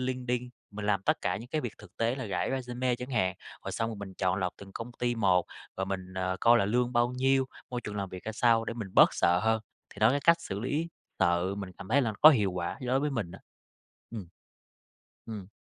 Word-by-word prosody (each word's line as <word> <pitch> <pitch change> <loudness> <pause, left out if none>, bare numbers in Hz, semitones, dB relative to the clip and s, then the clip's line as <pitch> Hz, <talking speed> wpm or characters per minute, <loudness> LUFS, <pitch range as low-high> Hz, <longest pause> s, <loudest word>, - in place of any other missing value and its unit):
LinkedIn, 125 -1 -2 0.2
mình 105 0 -6
làm 100 -2 +2
tất - - +2
cả - - 0
những 115 +5 -9
cái 155 - -1
việc 120 - -4
thực 105 -1 -15
tế 115 +2 +1
là 135 - -5
rải - - -1
resume 125 -1 -1
chẳng 125 +2 -7
hạn. 95 -6 +1 0.3
Rồi - - -4
xong 115 0 -1
rồi 110 - -6
mình 100 -2 -8
chọn 95 0 0
lọc 90 -2 -1
từng 100 -1 -12
công 115 +2 -6
ty 120 0 0
một 95 -5 +3 0.3
và 95 - -1
mình, 95 -1 -5
ờ, 95 0 -1
coi 120 0 +6
là - - +2
lương 120 +4 +1
bao 120 +1 +3
nhiêu, 135 +1 +3 0.3
môi 125 -1 -2
trường 105 -2 -6
làm 100 -1 -2
việc 90 0 -9
ra 110 - -3
sao 115 0 +3
để 115 - -4
mình 110 -5 -5
bớt - - +7
sợ 90 +1 +3
hơn, 110 0 +2 0.3
thì - - -14
đó, - - +6
cái 145 - +1
cách 170 +3 +5
xử 100 -9 -5
lý 150 +7 -1 0.3
sợ 90 +1 +2
mình 100 -2 -6
cảm 100 - -9
thấy 140 +5 +4
là 115 -3 0
có 155 - +11
hiệu 105 -10 +2
quả 90 -1 -3
đối 130 +1 +1
với 150 +1 0
mình 115 -10 -2
á. - - -10 0.7
Ừm. 105 -7 -7 1.0
Ừm. 105 -5 -7
115 Hz, 245 wpm, -29 LUFS, 95-125 Hz, 1.0 s, có